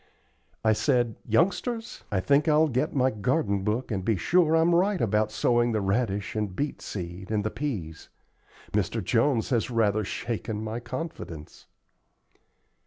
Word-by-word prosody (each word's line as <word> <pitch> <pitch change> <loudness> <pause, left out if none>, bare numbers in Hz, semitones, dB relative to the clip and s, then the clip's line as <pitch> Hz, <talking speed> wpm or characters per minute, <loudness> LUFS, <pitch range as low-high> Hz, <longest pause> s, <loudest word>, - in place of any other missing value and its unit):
I 110 -1 +4
said: 120 0 +1
"Youngsters, 195 - 0
I 100 - +1
think 145 - +3
I'll 155 0 +4
get 130 +5 -1
my 130 -1 +3
garden 105 -2 0
book 110 +5 -1
and 95 -3 -2
be 110 +2 +2
sure 165 - +3
I'm 165 +1 +4
right 190 +2 +2
about 105 -1 +1
sowing 120 +1 +2
the 110 - +1
radish 100 0 -1
and 105 -4 -2
beet 145 +5 -3
seed 90 0 -6
and 105 -1 0
the 110 - -2
peas. 95 - -5 0.6
Mr. - - -1
Jones 135 -4 +1
has 120 -1 +1
rather 110 -3 +2
shaken 110 +1 -4
my 110 +2 -3
confidence." 120 - -7
115 Hz, 150 wpm, -27 LUFS, 105-145 Hz, 0.6 s, I